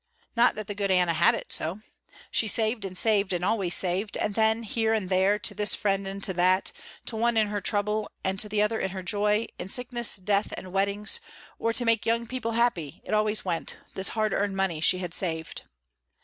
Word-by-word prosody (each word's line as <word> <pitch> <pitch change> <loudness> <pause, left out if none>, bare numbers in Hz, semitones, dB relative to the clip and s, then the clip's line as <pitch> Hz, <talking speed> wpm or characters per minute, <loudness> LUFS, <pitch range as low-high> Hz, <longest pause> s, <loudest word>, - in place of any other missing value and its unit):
Not 235 +1 +4
that 215 -1 -5
the 205 - -5
good 200 -1 -2
Anna 180 -2 +3
had 170 +1 +4
it - - -5
so. 175 +7 -3 0.5
She 220 - +2
saved 220 0 0
and 185 -1 -5
saved 205 -2 +2
and 180 0 -1
always 195 -4 +2
saved, 190 +3 0
and 210 - -1
then 220 +1 +2
here 225 0 0
and 195 -4 -2
there, 190 +2 +3
to 210 - 0
this 210 +1 +2
friend 195 -1 0
and 195 +1 -6
to 190 - -1
that, 185 +2 +2 0.3
to 230 - -3
one 235 +1 +1
in 215 -2 +3
her 205 -1 -2
trouble 210 +2 0
and 190 0 -1
to 210 - +2
the 210 0 +2
other 220 +1 0
in 190 - -1
her 190 0 -6
joy, 210 +4 +1
in 185 - -5
sickness, 240 0 +2
death, 200 +1 0
and 185 -1 -9
weddings, 200 - +1 0.4
or 230 - +1
to 245 - 0
make 230 -1 +2
young 230 +1 +1
people 235 -1 -3
happy, 225 - 0
it - - -5
always 215 0 +1
went, 170 -3 -3 0.2
the 190 - -5
hard 215 0 +1
earned 200 -1 -1
money 180 -5 0
she 185 - +4
had 180 -2 -4
saved. 160 -4 -1
205 Hz, 220 wpm, -27 LUFS, 190-220 Hz, 0.5 s, Not